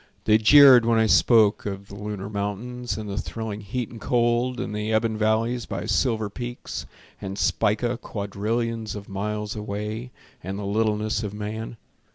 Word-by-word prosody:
They 110 Hz, 0 st, +5 dB
jeered 130 Hz, +1 st, +8 dB
when 115 Hz, 0 st, +2 dB
I 110 Hz, -, +4 dB
spoke 110 Hz, -2 st, +4 dB
of 100 Hz, 0 st, -6 dB
the -, -, -11 dB
lunar 105 Hz, -1 st, -5 dB
mountains, 105 Hz, +3 st, -4 dB
And 110 Hz, -1 st, -5 dB
the 100 Hz, 0 st, -3 dB
thrilling 110 Hz, -2 st, -5 dB
heat 115 Hz, +4 st, -4 dB
and 115 Hz, -2 st, -10 dB
cold, 120 Hz, +1 st, +1 dB
And 115 Hz, -, -3 dB
the 105 Hz, +1 st, -2 dB
ebon 110 Hz, 0 st, +1 dB
valleys 110 Hz, +2 st, 0 dB
by -, -, -4 dB
silver 110 Hz, -5 st, +1 dB
peaks, 120 Hz, +4 st, -6 dB, 0.3 s
And 95 Hz, 0 st, -5 dB
Spica 120 Hz, +5 st, +1 dB
quadrillions 110 Hz, +2 st, -3 dB
of 100 Hz, -1 st, -8 dB
miles 105 Hz, +2 st, -3 dB
away, 105 Hz, +3 st, -4 dB, 0.3 s
And 95 Hz, +2 st, -4 dB
the 100 Hz, -, -5 dB
littleness 105 Hz, +1 st, 0 dB
of 105 Hz, -2 st, -5 dB
man. 110 Hz, +2 st, -5 dB
110 Hz, 165 wpm, -24 LUFS, 105-115 Hz, 0.3 s, jeered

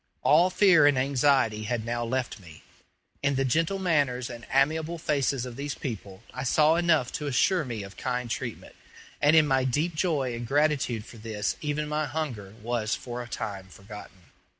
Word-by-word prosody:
All 170 Hz, +5 st, +5 dB
fear 185 Hz, -6 st, +5 dB
and 145 Hz, -2 st, +3 dB
anxiety 130 Hz, -5 st, +2 dB
had 110 Hz, 0 st, -2 dB
now 120 Hz, 0 st, -2 dB
left 120 Hz, 0 st, -2 dB
me; 85 Hz, -5 st, -14 dB, 0.6 s
in 140 Hz, 0 st, +1 dB
the 135 Hz, 0 st, +1 dB
gentle 165 Hz, +8 st, +1 dB
manners 140 Hz, -9 st, 0 dB
and 120 Hz, -1 st, -10 dB
amiable 155 Hz, +5 st, +1 dB
faces 140 Hz, -5 st, 0 dB
of 125 Hz, -1 st, -8 dB
these 145 Hz, +1 st, -4 dB
people 100 Hz, -5 st, -7 dB
I 130 Hz, -, -5 dB
saw 150 Hz, +4 st, +4 dB
enough 165 Hz, -7 st, +2 dB
to 150 Hz, -, -4 dB
assure 155 Hz, +6 st, +2 dB
me 115 Hz, -6 st, -5 dB
of 100 Hz, 0 st, -11 dB
kind 125 Hz, -1 st, -2 dB
treatment; 120 Hz, 0 st, -5 dB, 0.5 s
and 150 Hz, +2 st, +5 dB
in 155 Hz, -1 st, +6 dB
my 135 Hz, -2 st, +2 dB
deep 150 Hz, +7 st, 0 dB
joy 155 Hz, -6 st, 0 dB
and 120 Hz, 0 st, -5 dB
gratitude 140 Hz, -5 st, +1 dB
for 120 Hz, -, -13 dB
this 110 Hz, -2 st, -3 dB
even 150 Hz, 0 st, -2 dB
my 150 Hz, 0 st, -1 dB
hunger 125 Hz, -9 st, -5 dB
was 115 Hz, -1 st, -1 dB
for 120 Hz, 0 st, -6 dB
a 120 Hz, -, -8 dB
time 100 Hz, -4 st, -5 dB
forgotten. 95 Hz, -2 st, -13 dB
130 Hz, 180 wpm, -27 LUFS, 115-150 Hz, 0.6 s, in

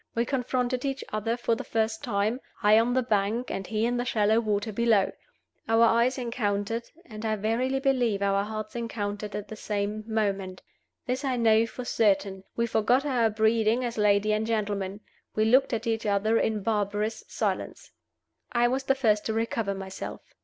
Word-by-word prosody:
We 235 Hz, +1 st, +1 dB
confronted 250 Hz, -1 st, -1 dB
each 270 Hz, -1 st, -2 dB
other 225 Hz, +2 st, -1 dB
for 235 Hz, -1 st, 0 dB
the 225 Hz, -, -3 dB
first 220 Hz, -1 st, -1 dB
time, 220 Hz, +2 st, 0 dB, 0.2 s
I 210 Hz, +1 st, +6 dB
on 240 Hz, +2 st, +1 dB
the 260 Hz, -, +2 dB
bank 220 Hz, +2 st, 0 dB
and 195 Hz, -1 st, -4 dB
he 220 Hz, +1 st, 0 dB
in 245 Hz, +1 st, 0 dB
the 245 Hz, -, 0 dB
shallow 220 Hz, -2 st, +2 dB
water 215 Hz, -1 st, -1 dB
below. 225 Hz, -3 st, +3 dB, 0.6 s
Our 225 Hz, +1 st, +5 dB
eyes 235 Hz, +3 st, +3 dB
encountered, 230 Hz, -2 st, -2 dB, 0.2 s
and 215 Hz, -5 st, -9 dB
I 220 Hz, -1 st, 0 dB
verily 235 Hz, +6 st, 0 dB
believe 245 Hz, -7 st, +1 dB
our 200 Hz, 0 st, +2 dB
hearts 215 Hz, +1 st, -6 dB
encountered 210 Hz, -3 st, -4 dB
at 210 Hz, 0 st, -5 dB
the 215 Hz, -, -7 dB
same 210 Hz, 0 st, -3 dB
moment. 200 Hz, -4 st, -2 dB, 0.4 s
This 255 Hz, +2 st, -2 dB
I 265 Hz, -2 st, 0 dB
know 225 Hz, -1 st, +4 dB
for 250 Hz, +2 st, -7 dB
certain, 195 Hz, -4 st, +1 dB
we 235 Hz, -, +1 dB
forgot 235 Hz, +4 st, +2 dB
our 245 Hz, -5 st, +2 dB
breeding 220 Hz, +2 st, +2 dB
as 235 Hz, -2 st, -4 dB
lady 210 Hz, 0 st, +3 dB
and 215 Hz, +1 st, 0 dB
gentleman: 205 Hz, -3 st, -2 dB, 0.3 s
we 215 Hz, -, +2 dB
looked 255 Hz, +5 st, +4 dB
at 230 Hz, 0 st, -2 dB
each 225 Hz, -1 st, -1 dB
other 210 Hz, +3 st, +2 dB
in 215 Hz, -2 st, 0 dB
barbarous 210 Hz, 0 st, -1 dB
silence. -, -, -3 dB, 0.6 s
I 240 Hz, 0 st, +4 dB
was 265 Hz, +2 st, -1 dB
the 270 Hz, -, +3 dB
first 215 Hz, -6 st, +2 dB
to 220 Hz, -, -1 dB
recover 225 Hz, -2 st, -1 dB
myself. 195 Hz, 0 st, -7 dB
220 Hz, 180 wpm, -27 LUFS, 210-235 Hz, 0.6 s, I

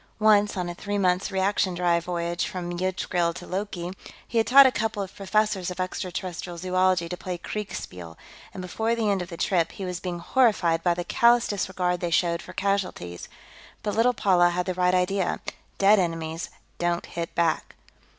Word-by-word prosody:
Once, 210 Hz, -1 st, +4 dB
on 180 Hz, -1 st, -1 dB
a 175 Hz, -, -4 dB
three 205 Hz, +3 st, -3 dB
months' 185 Hz, -1 st, +1 dB
reaction 190 Hz, -1 st, +1 dB
drive 170 Hz, -1 st, +1 dB
voyage 170 Hz, -1 st, -2 dB
from 180 Hz, -4 st, -5 dB
Yggdrasill 175 Hz, -2 st, -1 dB
to 180 Hz, -, -8 dB
Loki, 180 Hz, -2 st, -4 dB, 0.4 s
he 230 Hz, -, +1 dB
had 225 Hz, -, +1 dB
taught 275 Hz, +2 st, +9 dB
a 260 Hz, -, +5 dB
couple 215 Hz, -3 st, -1 dB
of 190 Hz, -, -10 dB
professors 200 Hz, -2 st, 0 dB
of 180 Hz, -, -7 dB
extraterrestrial 180 Hz, -1 st, -4 dB
zoology 185 Hz, 0 st, +1 dB
to 180 Hz, -, -4 dB
play 180 Hz, 0 st, -5 dB
kriegspiel, 90 Hz, -, -6 dB, 0.3 s
and 185 Hz, -, -7 dB
before 220 Hz, +5 st, -1 dB
the 220 Hz, -3 st, +1 dB
end 195 Hz, -2 st, 0 dB
of 175 Hz, -, -6 dB
the 170 Hz, -, -7 dB
trip, 170 Hz, -2 st, +1 dB
he 195 Hz, -, -6 dB
was 180 Hz, -1 st, -4 dB
being 180 Hz, -2 st, -4 dB
horrified 175 Hz, -4 st, +2 dB
by 175 Hz, 0 st, +2 dB
the 175 Hz, -, -3 dB
callous 235 Hz, +6 st, +4 dB
disregard 180 Hz, -3 st, -1 dB
they 175 Hz, -, -2 dB
showed 170 Hz, 0 st, +1 dB
for -, -, -10 dB
casualties. 185 Hz, -, -2 dB, 0.5 s
But 205 Hz, -, -1 dB
little 240 Hz, +3 st, +4 dB
Paula 180 Hz, -4 st, +4 dB
had 180 Hz, +1 st, -1 dB
the 185 Hz, -, -1 dB
right 180 Hz, 0 st, +2 dB
idea; 185 Hz, 0 st, 0 dB, 0.4 s
dead 200 Hz, +1 st, +5 dB
enemies 165 Hz, -2 st, -2 dB, 0.3 s
don't 175 Hz, 0 st, 0 dB
hit 170 Hz, -1 st, -6 dB
back. 170 Hz, -2 st, 0 dB
180 Hz, 185 wpm, -26 LUFS, 175-200 Hz, 0.5 s, taught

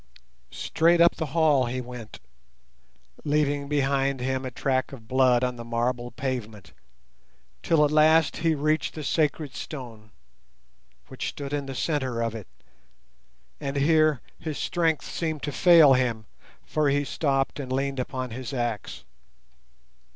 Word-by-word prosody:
Straight 170 Hz, -, +2 dB
up 170 Hz, 0 st, +5 dB
the 160 Hz, -, -2 dB
hall 145 Hz, -4 st, +3 dB
he 125 Hz, +2 st, -3 dB
went, 125 Hz, -3 st, -9 dB, 1.0 s
leaving 145 Hz, -1 st, 0 dB
behind 140 Hz, -1 st, +1 dB
him 130 Hz, +1 st, -2 dB
a -, -, -3 dB
track 130 Hz, +3 st, -1 dB
of 115 Hz, -5 st, -11 dB
blood 130 Hz, -1 st, +3 dB
on 125 Hz, -1 st, -1 dB
the 120 Hz, -, -7 dB
marble 120 Hz, +1 st, -2 dB
pavement, 115 Hz, -8 st, -5 dB, 0.9 s
till 155 Hz, -3 st, +3 dB
at 145 Hz, -, -1 dB
last 155 Hz, 0 st, +4 dB
he 160 Hz, 0 st, +1 dB
reached 155 Hz, +2 st, 0 dB
the 155 Hz, -, -5 dB
sacred 150 Hz, -1 st, 0 dB
stone, 115 Hz, -7 st, -8 dB, 1.0 s
which -, -, -4 dB
stood 140 Hz, 0 st, -7 dB
in 145 Hz, -1 st, -2 dB
the 135 Hz, -, -6 dB
centre 130 Hz, -5 st, -1 dB
of 115 Hz, -1 st, -2 dB
it, 110 Hz, -4 st, -8 dB, 1.1 s
and 140 Hz, -1 st, -4 dB
here 155 Hz, -1 st, +3 dB, 0.2 s
his 155 Hz, -3 st, -5 dB
strength 165 Hz, -3 st, 0 dB
seemed 160 Hz, -3 st, -3 dB
to 145 Hz, -, -2 dB
fail 155 Hz, +1 st, +7 dB
him, 120 Hz, -4 st, 0 dB, 0.4 s
for 155 Hz, -2 st, +1 dB
he 145 Hz, +1 st, +1 dB
stopped 135 Hz, -1 st, -1 dB
and 130 Hz, -2 st, -5 dB
leaned 135 Hz, 0 st, -1 dB
upon 130 Hz, -1 st, -4 dB
his 130 Hz, +3 st, -6 dB
axe. 120 Hz, -4 st, -3 dB
135 Hz, 145 wpm, -26 LUFS, 125-150 Hz, 1.1 s, fail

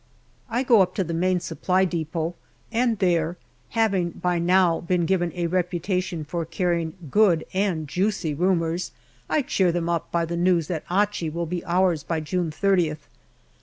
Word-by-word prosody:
I 240 Hz, +3 st, 0 dB
go 235 Hz, -5 st, +5 dB
up 185 Hz, -1 st, +1 dB
to 190 Hz, -, +1 dB
the 170 Hz, -1 st, -4 dB
Main 180 Hz, +2 st, +1 dB
Supply 185 Hz, +2 st, 0 dB
depot, 165 Hz, -1 st, -2 dB, 0.4 s
and 235 Hz, -1 st, +1 dB
there, 175 Hz, -3 st, +1 dB, 0.4 s
having 195 Hz, -6 st, +2 dB
by 175 Hz, 0 st, -1 dB
now 175 Hz, -1 st, +3 dB
been 175 Hz, 0 st, 0 dB
given 175 Hz, -1 st, +1 dB
a 175 Hz, -1 st, -1 dB
reputation 180 Hz, -1 st, -1 dB
for 170 Hz, +2 st, -3 dB
carrying 170 Hz, -1 st, -1 dB, 0.2 s
good 190 Hz, -7 st, +4 dB
and 185 Hz, -5 st, 0 dB
juicy 185 Hz, 0 st, -1 dB
rumours, 170 Hz, +1 st, 0 dB, 0.4 s
I 305 Hz, -, +2 dB
cheer 185 Hz, -7 st, +2 dB
them 170 Hz, 0 st, -2 dB
up 170 Hz, -2 st, -2 dB
by 170 Hz, -1 st, +1 dB
the 170 Hz, +1 st, -4 dB
news 175 Hz, -2 st, +2 dB
that 165 Hz, -4 st, -3 dB
Achi 200 Hz, -2 st, +1 dB
will 170 Hz, +2 st, -3 dB
be 175 Hz, +1 st, -4 dB
ours 175 Hz, -2 st, +2 dB
by 165 Hz, +2 st, -2 dB
June 170 Hz, +2 st, -2 dB
3oth. 165 Hz, -3 st, +1 dB
175 Hz, 165 wpm, -24 LUFS, 165-190 Hz, 0.4 s, go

